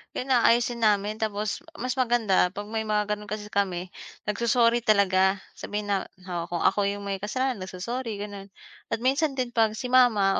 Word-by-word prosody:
'yon, 265 +1 -3
aayusin 240 0 +3
namin, 210 -1 +2
tapos 210 -1 -2 0.2
mas 255 -3 -2
maganda 230 -7 +3
'pag 205 0 -5
may 220 -1 -2
mga 210 0 +2
gano'n, 210 0 -7
kasi 210 0 -5
kami, 185 -2 -1 0.3
nag-so-sorry 235 +3 +2
talaga. 195 -4 +3 0.2
Sabihin 205 0 -4
na, 195 -1 0 0.2
oh, 175 -2 -4
kung 175 -1 -2
ako 200 -1 +3
yung 200 0 -3
may 195 -1 -3
kasalanan, 250 +3 -1
nag-so-sorry, 215 +5 -4
gano'n, 200 -1 -7 0.4
at 225 - -1
minsan 275 +2 +2
din 255 -2 -2
'pag 225 -2 +2
si 250 +2 -5
mama, 220 -7 +4
210 Hz, 175 wpm, -26 LUFS, 200-240 Hz, 0.4 s, mama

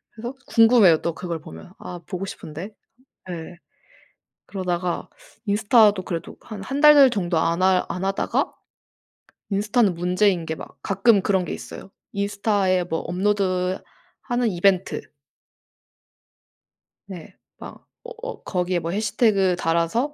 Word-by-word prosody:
그래서 235 +2 -6
궁금해요 225 -8 +5
또 170 - -1
그걸 170 -1 -5
보면. 80 - -12
'아 175 -1 -8
보고 185 +1 -4
싶은데?' 175 +3 -8 0.6
예. 170 0 -7 0.9
그러다가 180 -2 -3 0.4
인스타도 210 -1 +4
그래도 170 -2 -5
한 210 -3 -8
1 275 +7 -3
달 295 -3 +8
정도 180 -6 -1
안 170 +2 0
하 185 -1 +3
안 180 - -3
하다가 195 0 -1 1.0
인스타는 205 0 +1
문제인 180 0 +1
게 160 - -3
막 - - -11
가끔 200 +2 +3
그런 190 -2 +1
게 - - -4
있어요. - - -9 0.2
인스타에 200 -2 0
뭐 165 -2 -3
업로드하는 195 - -2
이벤트. 185 0 0 1.9
네. 180 -5 -10 0.2
막 - - -11 0.2
어 485 - -10
어 - - -6
거기에 180 -1 -1
뭐 165 0 -4
해시태그를 200 -2 +1
달아서 170 - 0
190 Hz, 255 characters per minute, -23 LUFS, 175-210 Hz, 1.9 s, 달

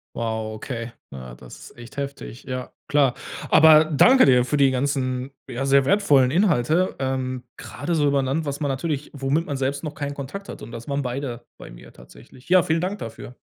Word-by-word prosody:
Wow, 110 -1 -3
okay. 115 +1 -6 0.2
Ja, 65 -2 -9
das 60 0 -13
ist - - -23
echt 120 +3 -12
heftig. 140 -3 -6
Ja, 130 -2 -5 0.2
klar. 140 -4 +2 0.3
Aber 155 0 +7
danke 250 - +5
dir 125 -2 +4
für 145 +4 -1
die 140 -1 +5
ganzen, 130 -1 -1 0.2
ja, 125 +3 -3
sehr 135 0 +4
wertvollen 145 -9 +4
Inhalte, 170 - +2
ähm, 130 -1 -2
grade 155 +6 -4
so 150 -2 +2
über 140 -1 +2
'n 135 - 0
Land, 150 +5 -1
was 140 0 -4
man 145 - -1
natürlich 140 +1 -3
womit 140 +4 -1
man 140 - -3
selbst 135 +2 -2
noch 150 -2 -5
keinen 145 -1 -4
Kontakt 145 +9 -7
hatte, - - -8
und 115 - -12
das 115 +3 -9
waren 140 0 -1
beide 125 -2 -5
bei - - -11
mir - - -14
tatsächlich. - - -17
Ja, 185 0 +6
vielen 160 +1 0
Dank 195 +3 -3
dafür. 115 +2 -8
135 Hz, 205 wpm, -23 LUFS, 125-150 Hz, 0.3 s, Aber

